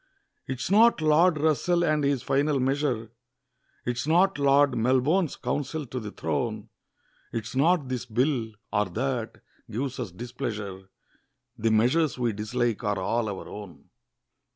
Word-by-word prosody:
'Tis 130 +6 -3
not 225 +1 +6
Lord 155 +2 +4
Russell 170 +3 +2
and 155 -2 +1
his 140 -3 +1
final 140 +1 +1
measure, 130 -4 0 0.7
'Tis 120 +3 -2
not 180 +2 +3
Lord 140 -1 +4
Melbourne's 130 +9 +2
counsel 145 +1 -3
to 130 +1 -5
the 105 -3 -6
throne, 105 +6 -3 0.6
'Tis 115 +2 -5
not 155 +1 +3
this 125 -1 -4
Bill, 120 0 0 0.2
or 105 0 +2
that, 125 -3 -3 0.3
gives 130 +4 -3
us 115 -7 -4
displeasure, 105 -3 -6 0.7
The 115 - 0
measures 130 +9 +2
we 120 -3 0
dislike 115 +2 -1
are 105 -2 0
all 110 +4 0
our 100 - -6
own. 100 -4 -10
125 Hz, 135 wpm, -27 LUFS, 110-145 Hz, 0.7 s, not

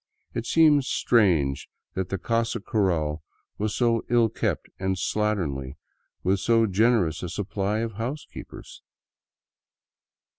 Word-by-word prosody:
It 115 0 -3
seemed 155 -3 +5
strange 85 - +2 0.2
that 95 -1 -3
the 95 - -1
casa 115 +3 -1
cural 85 -9 0 0.4
was 105 0 -1
so 115 -2 +2
ill 120 -2 +4
kept - - -2
and 95 0 0
slatternly 85 -11 -1 0.5
with 95 +2 +2
so 115 +1 +3
generous 100 -6 +2
a 90 - -4
supply 100 +3 -2
of 115 -1 -2
house 120 +8 -4
keepers. - - -11
105 Hz, 120 wpm, -25 LUFS, 90-115 Hz, 0.5 s, seemed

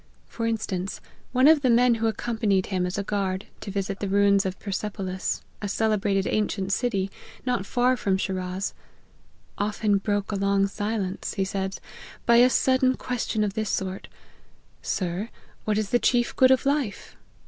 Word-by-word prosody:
For 230 -1 -3
instance, 195 -4 -2 0.3
one 255 +2 +5
of 310 -2 +6
the 260 - +2
men 240 +1 +5
who 225 - +3
accompanied 220 -4 0
him 185 -2 -1
as 180 - -4
a 200 - -1
guard 195 -1 -2
to - - -7
visit 195 0 -3
the 200 - -2
ruins 200 0 +4
of 185 -1 -4
Persepolis, 195 -2 -3 0.2
a 205 - -2
cele 220 +1 +2
brated 195 -1 0
ancient 200 -2 0
city, 195 -6 0 0.3
not 245 -6 -1
far 250 +1 +2
from 195 -5 0
Shiraz, 185 0 -3 0.4
" - - -35
often 210 -1 +1
broke 205 0 -1
a - - -1
long 200 0 +2
silence," 205 -1 -3
he 195 -2 0
says, 190 0 -3 0.2
" - - -17
by 235 0 +6
a 245 +1 +7
sudden 260 0 +3
ques 250 -2 -3
tion 215 - 0
of 205 -2 -1
this 215 -1 -2
sort: 190 0 -3 0.4
' - - -35 0.2
Sir, 185 +4 -3 0.4
what 210 -1 +1
is 215 -2 -1
the 240 - +4
chief 240 -1 +2
good 260 - +6
of 260 0 +3
life 275 -7 -1
205 Hz, 180 wpm, -25 LUFS, 195-235 Hz, 0.4 s, a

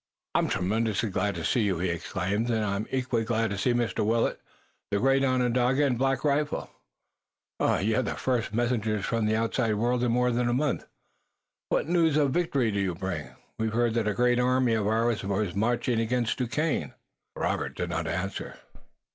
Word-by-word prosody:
"I'm - - +2
tremendously 110 +3 0
glad 100 +1 0
to 85 - -4
see 120 - +2
you," 100 -4 +1
he 90 +2 -1
exclaimed, 95 +6 -2
"and 110 -2 +1
I'm 100 +1 -2
equally 125 -3 0
glad 115 -1 0
to 100 - -2
see 125 - +2
Mr. 120 -3 0
Willet, 115 +2 +1 0.5
the 100 - +1
great 135 +5 +3
Onondaga, 130 +1 +2
and 130 -3 +1
Black 135 0 +1
Rifle. 150 0 0 0.9
You're 110 +6 +2
the 110 - -3
first 125 -5 -1
messengers 110 -3 0
from 115 -2 0
the 110 - +2
outside 115 0 0
world 120 +3 +1
in 120 - +2
more 125 +1 +2
than 120 0 +1
a - - +1
month. 140 +2 0 0.8
What - - +1
news 165 -3 +3
of 145 -3 +3
victory 140 -8 +1
do 100 - -1
you 95 -3 -1
bring? 90 -3 -4 0.3
We 110 - +1
heard 115 +1 +1
that 115 -2 0
a 105 - 0
great 125 0 +3
army 125 -1 +2
of 110 -2 0
ours 115 0 +1
was 100 -1 -1
marching 120 +3 0
against 120 +1 0
Duquesne." 140 +6 -1 0.4
Robert - - -2
did 90 -1 -2
not 80 -1 -2
answer. 95 +4 -4
115 Hz, 180 wpm, -27 LUFS, 105-125 Hz, 0.9 s, great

